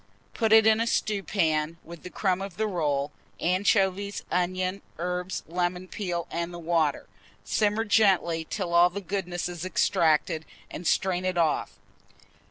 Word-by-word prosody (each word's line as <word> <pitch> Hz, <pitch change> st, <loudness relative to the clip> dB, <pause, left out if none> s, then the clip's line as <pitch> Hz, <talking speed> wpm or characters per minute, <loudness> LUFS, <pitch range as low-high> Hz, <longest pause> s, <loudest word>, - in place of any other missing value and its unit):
Put 225 Hz, -2 st, 0 dB
it 220 Hz, 0 st, +7 dB
in 220 Hz, 0 st, +5 dB
a 230 Hz, -, 0 dB
stewpan, 170 Hz, -8 st, 0 dB
with 170 Hz, -1 st, -11 dB
the 180 Hz, -, -8 dB
crumb 185 Hz, -1 st, 0 dB
of 195 Hz, -3 st, -7 dB
the 220 Hz, -, +1 dB
roll, 150 Hz, -7 st, -1 dB, 0.3 s
anchovies, 195 Hz, +2 st, +1 dB
onions, 185 Hz, +2 st, -1 dB, 0.2 s
herbs, 180 Hz, +2 st, -3 dB
lemon 180 Hz, +2 st, -2 dB
peel, 175 Hz, -4 st, -3 dB
and 170 Hz, +1 st, -3 dB
the 175 Hz, -, -7 dB
water; 165 Hz, -4 st, 0 dB, 0.4 s
simmer 215 Hz, +1 st, +1 dB
gently 190 Hz, -6 st, +3 dB
till 185 Hz, -5 st, -3 dB
all 175 Hz, +1 st, +6 dB
the 190 Hz, +3 st, -5 dB
goodness 180 Hz, -3 st, -3 dB
is 175 Hz, -1 st, -6 dB
extracted, 160 Hz, -3 st, +2 dB, 0.3 s
and 175 Hz, -, -5 dB
strain 185 Hz, -1 st, +1 dB
it 185 Hz, -1 st, -1 dB
off. 160 Hz, -3 st, 0 dB
180 Hz, 150 wpm, -27 LUFS, 170-195 Hz, 0.4 s, it